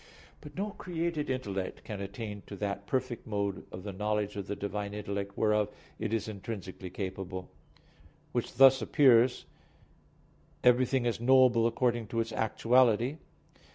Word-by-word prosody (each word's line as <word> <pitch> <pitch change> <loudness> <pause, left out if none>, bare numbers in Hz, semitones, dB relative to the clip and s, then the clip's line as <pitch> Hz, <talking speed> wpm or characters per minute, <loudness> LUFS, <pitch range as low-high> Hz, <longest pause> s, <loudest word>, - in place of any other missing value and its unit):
But 145 -1 -11
no 205 +2 -2
created 170 -5 -3
intellect 100 -8 -3
can 105 -2 -6
attain 105 +1 -6
to 100 - -7
that 100 0 -4
perfect 130 -2 -2
mode 100 -3 -2
of 90 - -8
the 100 -1 -5
knowledge 105 +1 -1
of 100 -1 -5
the 105 - -3
Divine 100 0 -4
intellect 100 -1 -4
whereof 105 -1 +2 0.3
it - - -2
is 110 -1 -1
intrinsically 100 -3 -6
capable. 95 -1 -5 0.8
Which - - -2
thus 135 0 +7
appears 125 0 +4 1.2
Everything 125 +1 +4
is 120 -1 -1
knowable 125 -2 +5
according 120 -1 0
to 115 - -2
its 115 0 -1
actuality. 120 +4 +3
110 Hz, 140 wpm, -30 LUFS, 100-125 Hz, 1.2 s, thus